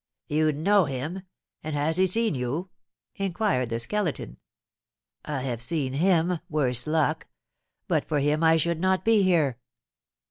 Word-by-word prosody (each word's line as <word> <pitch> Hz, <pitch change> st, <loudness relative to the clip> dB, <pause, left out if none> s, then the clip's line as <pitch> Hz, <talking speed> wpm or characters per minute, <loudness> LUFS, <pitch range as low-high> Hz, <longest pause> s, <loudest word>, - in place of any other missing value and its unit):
"You 155 Hz, +1 st, +2 dB
know 185 Hz, +6 st, +3 dB
him? 145 Hz, +7 st, -4 dB, 0.4 s
And 155 Hz, -1 st, -4 dB
has 155 Hz, +3 st, +1 dB
he 190 Hz, 0 st, +4 dB
seen 225 Hz, +3 st, +3 dB
you?" 140 Hz, +8 st, -3 dB, 0.5 s
inquired 195 Hz, -, 0 dB
the 115 Hz, 0 st, -2 dB
Skeleton. 165 Hz, -, -2 dB, 0.9 s
"I 145 Hz, -3 st, -3 dB
have 120 Hz, -3 st, -3 dB
seen 135 Hz, -1 st, -2 dB
him, 175 Hz, +2 st, +2 dB
worse 125 Hz, -5 st, 0 dB
luck! 155 Hz, 0 st, 0 dB, 0.6 s
But -, -, 0 dB
for 150 Hz, -, 0 dB
him 150 Hz, +3 st, +1 dB
I 160 Hz, 0 st, +5 dB
should 170 Hz, +1 st, -1 dB
not 185 Hz, +1 st, +1 dB
be 225 Hz, -2 st, +4 dB
here." 160 Hz, -10 st, +2 dB
155 Hz, 145 wpm, -26 LUFS, 140-185 Hz, 0.9 s, I